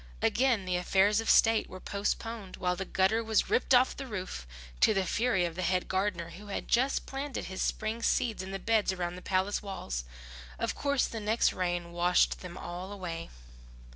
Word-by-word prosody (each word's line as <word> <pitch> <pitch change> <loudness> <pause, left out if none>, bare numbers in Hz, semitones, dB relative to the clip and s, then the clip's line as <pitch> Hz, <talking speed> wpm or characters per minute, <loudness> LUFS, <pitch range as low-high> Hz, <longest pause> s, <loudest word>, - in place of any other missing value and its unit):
Again 245 -6 +2
the 180 -1 0
affairs 195 +4 +3
of 225 - -3
state 225 -1 +5
were 185 - -8
postponed 205 +1 -3
while 180 0 0
the 190 +2 -4
gutter 195 +5 +2
was 220 -1 +1
ripped 255 +1 +4
off 250 +1 +4
the 275 - -6
roof, 185 - -5 0.3
to 215 - +5
the 195 -1 +1
fury 220 -4 +1
of 170 - -3
the 185 - -4
head 180 +1 +1
gardener, 190 -3 -1
who 205 +4 -11
had 200 - -4
just 260 +3 +2
planted 275 0 -4
his 190 0 -5
spring 220 +2 -1
seeds 230 -2 +1
in 190 - -6
the 195 - -3
beds 215 +1 +2
around 175 -1 -3
the 180 - -9
palace 190 +2 0
walls. 185 - -4 0.5
Of - - -1
course 280 -2 +1
the 225 - -5
next 215 +2 +2
rain 175 -1 -2
washed 175 +1 +2
them 180 -1 -8
all 180 +3 -6
away. 170 -4 -5
195 Hz, 195 wpm, -30 LUFS, 180-225 Hz, 0.5 s, state